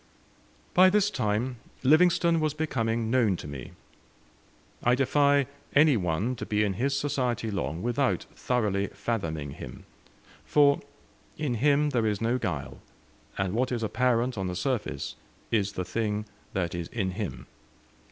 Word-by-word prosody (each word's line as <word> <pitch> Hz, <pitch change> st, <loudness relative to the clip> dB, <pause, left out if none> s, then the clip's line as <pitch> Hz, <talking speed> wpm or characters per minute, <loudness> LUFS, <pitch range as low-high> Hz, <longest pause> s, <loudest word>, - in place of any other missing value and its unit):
By 185 Hz, +1 st, +7 dB
this 205 Hz, +1 st, +3 dB
time 120 Hz, -, -1 dB, 0.3 s
Livingstone 170 Hz, +3 st, +4 dB
was 155 Hz, -1 st, 0 dB
becoming 115 Hz, -7 st, -1 dB
known 115 Hz, -6 st, +3 dB
to -, -, -8 dB
me. 70 Hz, -3 st, -8 dB, 1.1 s
I 120 Hz, +1 st, +4 dB
defy 140 Hz, +1 st, +3 dB, 0.3 s
any 145 Hz, -1 st, +6 dB
one 95 Hz, +5 st, 0 dB
to 110 Hz, -, -5 dB
be 105 Hz, 0 st, +2 dB
in 100 Hz, -2 st, 0 dB
his 135 Hz, +7 st, 0 dB
society 125 Hz, -5 st, -1 dB
long 90 Hz, -3 st, -3 dB
without 120 Hz, +3 st, +1 dB
thoroughly 105 Hz, -5 st, 0 dB
fathoming 85 Hz, -9 st, -3 dB
him, -, -, -9 dB, 0.6 s
for 145 Hz, -1 st, +4 dB, 0.6 s
in 150 Hz, -5 st, -1 dB
him 145 Hz, +5 st, +3 dB
there 115 Hz, -4 st, +1 dB
is 105 Hz, -2 st, 0 dB
no 120 Hz, +3 st, +1 dB
guile, 70 Hz, -, -4 dB, 0.6 s
and 95 Hz, -1 st, -1 dB
what 125 Hz, +3 st, 0 dB
is 120 Hz, -2 st, -1 dB
apparent 120 Hz, +1 st, +1 dB
on 95 Hz, -, -1 dB
the 90 Hz, -, -3 dB
surface 120 Hz, +4 st, -2 dB, 0.4 s
is 100 Hz, -3 st, +1 dB
the 90 Hz, -, -3 dB
thing 105 Hz, +2 st, -2 dB, 0.3 s
that 90 Hz, -2 st, -1 dB
is 85 Hz, -1 st, -4 dB
in 95 Hz, -5 st, -2 dB
him. 90 Hz, -, -5 dB
115 Hz, 145 wpm, -28 LUFS, 100-140 Hz, 1.1 s, By